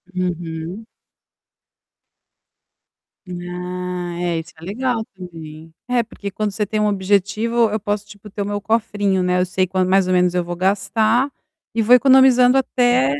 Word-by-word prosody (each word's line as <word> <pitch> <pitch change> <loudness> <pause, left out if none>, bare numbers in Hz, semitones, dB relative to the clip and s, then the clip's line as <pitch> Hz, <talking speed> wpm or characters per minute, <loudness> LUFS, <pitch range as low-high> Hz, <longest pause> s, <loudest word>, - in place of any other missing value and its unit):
Uhum. 175 +2 -4 2.4
Ah 180 0 -5
é, 175 -2 -1
isso 165 +2 -9
é - - -14
legal 230 +3 -2
também. 165 -3 -10 0.2
É, 250 -1 +2
porque 205 -3 -8
quando 210 +1 -2
você 210 +2 -2
tem 215 +2 -2
um 210 - +2
objetivo, 205 +4 +1
eu 215 +1 -2
posso, 205 0 -3
tipo, 210 0 -13
ter 205 - -5
o 200 - -1
meu 205 0 -2
cofrinho, 205 -3 0
né. 180 0 +1
Eu 180 - +2
sei 185 0 0
quan 185 0 0
mais 190 0 +3
ou 185 - +1
menos 180 -1 +3
eu 180 -1 0
vou 175 0 -5
gastar 215 +7 +1 0.4
e 230 - +2
vou 235 +4 +5
economizando 260 -1 +6
até 245 - +2
195 Hz, 160 wpm, -20 LUFS, 180-220 Hz, 2.4 s, economizando